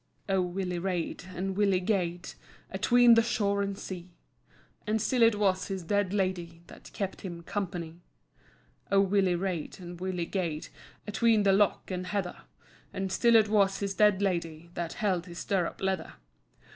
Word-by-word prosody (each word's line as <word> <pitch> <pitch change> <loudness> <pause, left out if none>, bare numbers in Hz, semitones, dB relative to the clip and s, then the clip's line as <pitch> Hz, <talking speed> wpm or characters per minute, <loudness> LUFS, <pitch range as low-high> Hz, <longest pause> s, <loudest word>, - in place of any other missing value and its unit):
O 190 -1 +2
Willie 180 0 -2
rade, 180 -1 -3
and 190 +2 -2
Willie 200 -2 +3
gaed 180 -3 -1 0.4
Atween 240 +5 +5
the 230 - +6
shore 200 -3 0
and 200 -1 -2
sea, 185 -2 -7 0.8
And 215 +1 +1
still 245 +3 0
it 230 -1 +6
was 190 -2 +1
his 190 -3 -4
dead 200 +2 0
Lady 180 -4 -2
That - - -14
kept 195 -2 -4
him 170 -3 -7
company. 175 -3 -4 0.9
O 195 - +5
Willie 195 -2 +3
rade, 180 -2 -3
and 175 -1 -9
Willie 185 -2 -2
gaed 170 -4 -3 0.4
Atween 220 0 +3
the 195 -1 +4
[loch 205 +1 +3
and 185 0 -3
heather], 190 -3 -2 0.5
And 195 -1 -3
still 235 +4 +4
it 220 -1 +6
was 200 -2 +3
his 200 -1 -2
dead 205 -1 +4
Lady 170 -3 -2
That 170 -1 -4
[held 185 -4 -1
his 170 -1 -9
stirrup 185 -3 -1
leather]. 190 -4 -2
190 Hz, 160 wpm, -29 LUFS, 175-205 Hz, 0.9 s, the